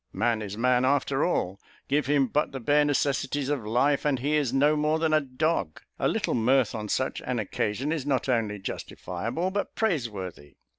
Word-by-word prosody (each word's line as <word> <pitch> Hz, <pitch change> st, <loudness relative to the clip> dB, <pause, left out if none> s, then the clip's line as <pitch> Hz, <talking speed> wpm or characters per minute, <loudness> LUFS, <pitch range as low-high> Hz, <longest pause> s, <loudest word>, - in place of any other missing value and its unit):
Man 115 Hz, -2 st, +1 dB
is 105 Hz, -1 st, -6 dB
man 125 Hz, +1 st, +3 dB
after 140 Hz, +1 st, +2 dB
all 100 Hz, -, 0 dB, 0.3 s
give 145 Hz, -1 st, +1 dB
him 140 Hz, -1 st, +3 dB
but 145 Hz, +5 st, 0 dB
the 135 Hz, -, -4 dB
bare 145 Hz, +4 st, +3 dB
necessaries 140 Hz, -1 st, 0 dB
of 145 Hz, -6 st, -1 dB
life, 125 Hz, +6 st, +2 dB
and 145 Hz, -3 st, +1 dB
he 145 Hz, +5 st, 0 dB
is 145 Hz, -5 st, +1 dB
no 145 Hz, +3 st, +3 dB
more 150 Hz, +1 st, +1 dB
than 160 Hz, -1 st, +1 dB
a 155 Hz, -, +4 dB
dog. 130 Hz, -, -1 dB, 0.2 s
A -, -, +2 dB
little -, -, 0 dB
mirth 125 Hz, +1 st, +2 dB
on 105 Hz, -2 st, -5 dB
such 130 Hz, +5 st, -1 dB
an 125 Hz, -1 st, -2 dB
occasion, 110 Hz, +5 st, -2 dB
is 160 Hz, -4 st, -1 dB
not 140 Hz, -2 st, 0 dB
only 115 Hz, -5 st, 0 dB
justifiable, 110 Hz, -, -4 dB
but 200 Hz, +1 st, -3 dB
praiseworthy. 110 Hz, -, -3 dB
135 Hz, 190 wpm, -27 LUFS, 115-150 Hz, 0.3 s, a